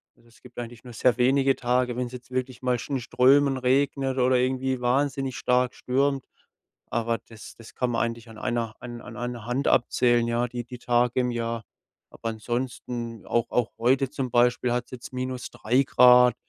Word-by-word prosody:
Also, 120 Hz, -, -26 dB
es 115 Hz, -, -23 dB
gibt 125 Hz, -1 st, -16 dB
eigentlich 120 Hz, -1 st, -8 dB
nur 120 Hz, -2 st, -10 dB
sehr 120 Hz, +2 st, +2 dB
wenige 135 Hz, +2 st, +3 dB
Tage 125 Hz, 0 st, 0 dB
wenn's 125 Hz, -1 st, -2 dB
jetzt 125 Hz, 0 st, -10 dB
wirklich 130 Hz, -1 st, -3 dB
mal 125 Hz, -1 st, +1 dB
schnö 140 Hz, -, -4 dB
in 130 Hz, -, -2 dB
Strömen 135 Hz, +3 st, +4 dB
regnet 135 Hz, +1 st, +1 dB
oder 125 Hz, 0 st, +4 dB
irgendwie 130 Hz, 0 st, 0 dB
wahnsinnig 135 Hz, +1 st, 0 dB
stark 125 Hz, 0 st, +1 dB
stürmt. 135 Hz, +1 st, 0 dB, 0.7 s
Aber 115 Hz, 0 st, 0 dB
das 110 Hz, -1 st, -12 dB
das 115 Hz, -1 st, -13 dB
kann 125 Hz, -, 0 dB
man 115 Hz, -, 0 dB
eigentlich 115 Hz, 0 st, -5 dB
an 110 Hz, -, -12 dB
einer 120 Hz, -2 st, -2 dB
an 120 Hz, -1 st, -8 dB, 0.2 s
einer 120 Hz, -2 st, -5 dB
Hand 125 Hz, +3 st, -1 dB
abzählen, 120 Hz, -1 st, +3 dB
ja, 120 Hz, +1 st, 0 dB
die 120 Hz, 0 st, -5 dB
die 125 Hz, 0 st, -9 dB
Tage 120 Hz, +1 st, +1 dB
im 125 Hz, 0 st, -1 dB
Jahr. 115 Hz, -1 st, -3 dB, 0.5 s
Aber 115 Hz, -, -5 dB
ansonsten 120 Hz, 0 st, -4 dB
auch 120 Hz, -1 st, 0 dB
auch 120 Hz, -2 st, +1 dB
heute 130 Hz, +2 st, +2 dB
zum 135 Hz, -3 st, -3 dB
Beispiel 120 Hz, 0 st, +3 dB
hat's 125 Hz, +1 st, -3 dB
jetzt 125 Hz, -1 st, -9 dB
-3 125 Hz, -1 st, -1 dB
Grad. 125 Hz, -2 st, +6 dB
125 Hz, 180 wpm, -26 LUFS, 120-130 Hz, 0.7 s, Grad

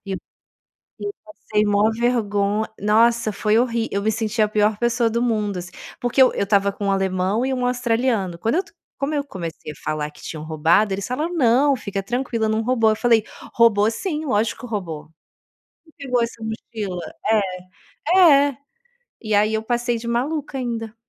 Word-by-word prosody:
E 195 Hz, -, -4 dB
eu -, -, -3 dB, 1.1 s
passei 215 Hz, -9 st, -2 dB
maior 205 Hz, +1 st, +3 dB
vergo 215 Hz, -3 st, 0 dB
nossa, 220 Hz, +2 st, +3 dB
foi 210 Hz, +2 st, +1 dB
horrí 235 Hz, -2 st, 0 dB
eu 200 Hz, -, -1 dB
me 220 Hz, +1 st, +1 dB
senti 220 Hz, 0 st, -1 dB
a 210 Hz, -, +3 dB
pior 210 Hz, 0 st, +2 dB
pessoa 235 Hz, 0 st, +1 dB
do 235 Hz, +1 st, -1 dB
mundo, 215 Hz, -5 st, 0 dB
assim, 175 Hz, 0 st, -7 dB, 0.3 s
porque 245 Hz, +2 st, 0 dB
eu 260 Hz, -, +7 dB
eu -, -, 0 dB
estava 200 Hz, 0 st, +2 dB
com 200 Hz, 0 st, -5 dB
um 195 Hz, -, +2 dB
alemão 190 Hz, +3 st, 0 dB
e 265 Hz, -, 0 dB
um 250 Hz, -1 st, -2 dB
australiano. 235 Hz, -7 st, 0 dB
Quando 225 Hz, -, 0 dB
eu 375 Hz, -, +2 dB, 0.4 s
como 280 Hz, +2 st, -1 dB
eu 285 Hz, -1 st, -1 dB
comecei 170 Hz, -, -7 dB
a -, -, -14 dB
falar 150 Hz, -1 st, -2 dB
que 150 Hz, -, -18 dB
tinham 155 Hz, -2 st, -6 dB
roubado, 165 Hz, +6 st, +2 dB
eles 195 Hz, 0 st, -3 dB
falavam: 305 Hz, +8 st, -2 dB
"Não, 275 Hz, -1 st, +4 dB
fica 200 Hz, -4 st, -4 dB
tranquila, 230 Hz, +1 st, -1 dB
não 220 Hz, +1 st, 0 dB
roubou". 230 Hz, -2 st, +2 dB
Eu 215 Hz, -, +1 dB
falei: 230 Hz, -2 st, +3 dB, 0.3 s
"Roubou 220 Hz, -2 st, +4 dB
sim, 310 Hz, -, -3 dB
lógico, 230 Hz, +1 st, -1 dB
roubou. 170 Hz, -9 st, -5 dB, 0.8 s
Quem 315 Hz, -, -23 dB, 0.2 s
pegou 250 Hz, -1 st, +2 dB
essa 230 Hz, -1 st, -4 dB
mochila?". 220 Hz, -4 st, -5 dB, 1.2 s
É, -, -, +6 dB, 0.3 s
é. 270 Hz, -, -9 dB, 0.6 s
E 215 Hz, -2 st, -2 dB
aí 210 Hz, +2 st, +3 dB
eu 220 Hz, -, 0 dB
passei 240 Hz, +1 st, -1 dB
de 235 Hz, -, -8 dB
maluca 275 Hz, +4 st, -2 dB
ainda. 230 Hz, -3 st, -4 dB
220 Hz, 180 wpm, -22 LUFS, 205-245 Hz, 1.2 s, eu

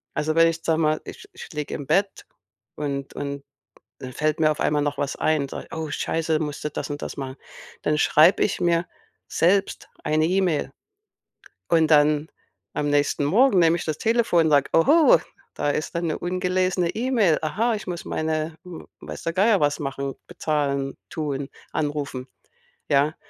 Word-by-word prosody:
Also, 155 Hz, +1 st, -1 dB
wenn 165 Hz, 0 st, +6 dB
ich, 165 Hz, 0 st, -4 dB
sage 160 Hz, -1 st, +1 dB
mal, 155 Hz, -1 st, +1 dB
ich 410 Hz, -, -10 dB
ich 380 Hz, -, -10 dB
liege 150 Hz, -1 st, -4 dB
im 145 Hz, -3 st, -7 dB
Bett 195 Hz, 0 st, 0 dB, 0.5 s
und 140 Hz, -2 st, -4 dB
und 140 Hz, -1 st, -5 dB, 0.6 s
dann 130 Hz, -1 st, -8 dB
fällt 155 Hz, +3 st, 0 dB
mir 155 Hz, -1 st, +4 dB
auf 155 Hz, -, -4 dB
einmal 150 Hz, 0 st, +2 dB
noch 145 Hz, -1 st, -2 dB
was 140 Hz, -2 st, -2 dB
ein 155 Hz, -2 st, +1 dB
und 140 Hz, -, -7 dB
sage: -, -, -7 dB
„Oh, 160 Hz, -2 st, -4 dB
Scheiße, 160 Hz, +1 st, -1 dB
musst 150 Hz, -2 st, -4 dB
du -, -, 0 dB
das -, -, -5 dB
und 145 Hz, 0 st, -5 dB
das -, -, -6 dB
machen.“ 135 Hz, -1 st, -6 dB, 0.5 s
Dann 150 Hz, -, +1 dB
schreibe 160 Hz, +7 st, +5 dB
ich 195 Hz, -, -1 dB
mir 170 Hz, 0 st, +2 dB, 0.4 s
selbst 195 Hz, +4 st, +1 dB
eine 155 Hz, +1 st, +2 dB
E-Mail 175 Hz, -5 st, 0 dB, 1.0 s
und 160 Hz, -2 st, +3 dB
dann, 150 Hz, 0 st, +4 dB, 0.5 s
am 145 Hz, 0 st, -1 dB
nächsten 145 Hz, 0 st, +1 dB
Morgen, 205 Hz, -, +4 dB
nehme 165 Hz, 0 st, +4 dB
ich -, -, -5 dB
das 155 Hz, -2 st, -1 dB
Telefon, 220 Hz, -8 st, +2 dB
sage: 145 Hz, -2 st, +4 dB
„Oho, 285 Hz, -, +6 dB, 0.4 s
da 145 Hz, -, -1 dB
ist 155 Hz, +4 st, -3 dB
da 170 Hz, -, 0 dB
'ne 165 Hz, -2 st, -1 dB
ungelesene 180 Hz, 0 st, 0 dB
E-Mail. 225 Hz, -8 st, +2 dB
Aha, 225 Hz, +9 st, 0 dB
ich 210 Hz, -, -8 dB
muss 175 Hz, -1 st, -4 dB
meine 155 Hz, 0 st, -2 dB
w 180 Hz, -3 st, -9 dB, 0.2 s
weiß -, -, -8 dB
der 165 Hz, -, -1 dB
Geier 200 Hz, +1 st, +3 dB
was 145 Hz, -1 st, +1 dB
machen, 140 Hz, -1 st, -4 dB
bezahlen, 145 Hz, -5 st, -1 dB, 0.2 s
tun, 145 Hz, -4 st, -3 dB, 0.2 s
anrufen.“, 145 Hz, -3 st, -3 dB, 0.6 s
ja? 145 Hz, +2 st, +2 dB
155 Hz, 175 wpm, -24 LUFS, 145-175 Hz, 1.0 s, wenn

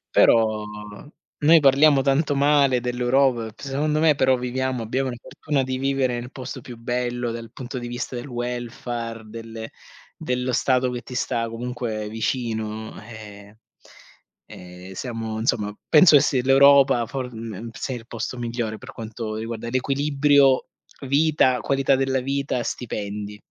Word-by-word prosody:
però, 110 Hz, -2 st, +4 dB, 0.8 s
noi 160 Hz, +3 st, +7 dB
parliamo 140 Hz, 0 st, +5 dB
tanto 145 Hz, +1 st, +1 dB
male 140 Hz, -3 st, +3 dB
dell'Europa, 125 Hz, -1 st, +1 dB
secondo 150 Hz, +3 st, -1 dB
me 155 Hz, -1 st, +4 dB
però 130 Hz, -1 st, +3 dB
viviamo 125 Hz, 0 st, -2 dB
abbiamo 130 Hz, +3 st, -1 dB
la 120 Hz, -, -6 dB
fortuna 145 Hz, -3 st, -2 dB
di 130 Hz, 0 st, -3 dB
vivere 130 Hz, -2 st, 0 dB
nel 125 Hz, +1 st, -9 dB
posto 130 Hz, 0 st, -7 dB
più 120 Hz, 0 st, -10 dB
bello, 120 Hz, 0 st, -2 dB
dal 115 Hz, -1 st, -7 dB
punto 130 Hz, 0 st, -6 dB
di 120 Hz, -, -6 dB
vista 120 Hz, +1 st, -5 dB
del 120 Hz, +3 st, -5 dB
welfare 120 Hz, -2 st, -5 dB
del 115 Hz, 0 st, -8 dB, 0.5 s
dello 125 Hz, 0 st, -2 dB
stato 125 Hz, 0 st, +2 dB
che 120 Hz, -, -4 dB
ti 125 Hz, +1 st, -9 dB
sta 115 Hz, -3 st, -1 dB
comunque 115 Hz, -2 st, -4 dB
vicino, 110 Hz, -1 st, -3 dB, 0.2 s
e, 105 Hz, -1 st, -12 dB, 0.9 s
ehm, 90 Hz, +1 st, -11 dB
siamo 115 Hz, 0 st, -4 dB
insomma, 105 Hz, -2 st, -1 dB
penso 155 Hz, 0 st, +7 dB
che 140 Hz, -, +6 dB
sia 130 Hz, -4 st, +1 dB
l'Europa 135 Hz, -2 st, +6 dB
for 125 Hz, 0 st, -5 dB
mhmm, 115 Hz, 0 st, -7 dB
sia 130 Hz, +1 st, -4 dB
il 115 Hz, -1 st, -11 dB
posto 120 Hz, +2 st, -5 dB
migliore 115 Hz, -2 st, -3 dB
per 130 Hz, +1 st, -11 dB
quanto 110 Hz, -1 st, -6 dB
riguarda 115 Hz, +1 st, -5 dB
l'equilibrio, 140 Hz, +1 st, +3 dB, 0.4 s
vita, 140 Hz, -3 st, +3 dB
qualità 135 Hz, -1 st, +2 dB
della 135 Hz, 0 st, 0 dB
vita, 135 Hz, -2 st, -2 dB
stipendi. 105 Hz, -3 st, -5 dB
125 Hz, 145 wpm, -23 LUFS, 115-135 Hz, 0.9 s, noi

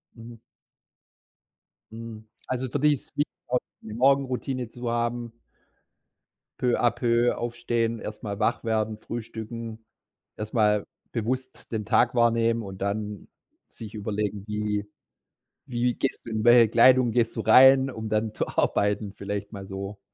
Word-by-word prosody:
Mhm. 115 Hz, 0 st, -11 dB, 1.5 s
Mhm, 110 Hz, -1 st, -9 dB, 0.2 s
also 130 Hz, 0 st, -2 dB
für 145 Hz, -, -2 dB
dich 150 Hz, +1 st, +4 dB
ist -, -, -11 dB
es -, -, -35 dB
wichtig, 145 Hz, -, -1 dB
auch 125 Hz, 0 st, +1 dB, 0.2 s
die 110 Hz, -, -9 dB
Morgenroutine 130 Hz, -1 st, +1 dB
zu 120 Hz, 0 st, -5 dB
haben. 120 Hz, 0 st, -2 dB, 1.3 s
Peu 125 Hz, -1 st, +2 dB
à 120 Hz, -, +4 dB
peu 120 Hz, 0 st, +1 dB
aufstehen, 120 Hz, -1 st, -1 dB
erst 105 Hz, +1 st, -7 dB
mal 100 Hz, -1 st, -4 dB
wach -, -, +1 dB
werden, 110 Hz, -1 st, -1 dB
frühstücken, 115 Hz, 0 st, -7 dB, 0.5 s
erst 105 Hz, +2 st, -6 dB
mal 105 Hz, -2 st, +3 dB, 0.3 s
bewusst 130 Hz, +3 st, -4 dB
den 110 Hz, -2 st, -2 dB
Tag 120 Hz, +3 st, +3 dB
wahrnehmen 115 Hz, -1 st, +2 dB
und 95 Hz, -1 st, -9 dB
dann 105 Hz, 0 st, -3 dB, 0.4 s
sich 110 Hz, -1 st, -10 dB
überlegen, 105 Hz, -1 st, -3 dB
wie 105 Hz, -1 st, -2 dB, 0.8 s
wie 120 Hz, 0 st, +1 dB
gehst 135 Hz, -, -3 dB
du 115 Hz, -, -7 dB
in 110 Hz, -1 st, -1 dB
welcher 120 Hz, -2 st, +7 dB
Kleidung 125 Hz, +1 st, +5 dB
gehst 115 Hz, -1 st, +1 dB
du 115 Hz, -, -1 dB
rein, 130 Hz, +4 st, +7 dB
um 110 Hz, -2 st, -6 dB
dann 110 Hz, 0 st, 0 dB
zu -, -, -2 dB
arbeiten, 105 Hz, 0 st, 0 dB
vielleicht 100 Hz, +1 st, -5 dB
mal 100 Hz, -2 st, -8 dB
so 100 Hz, +1 st, -6 dB
115 Hz, 145 wpm, -26 LUFS, 105-120 Hz, 1.5 s, welcher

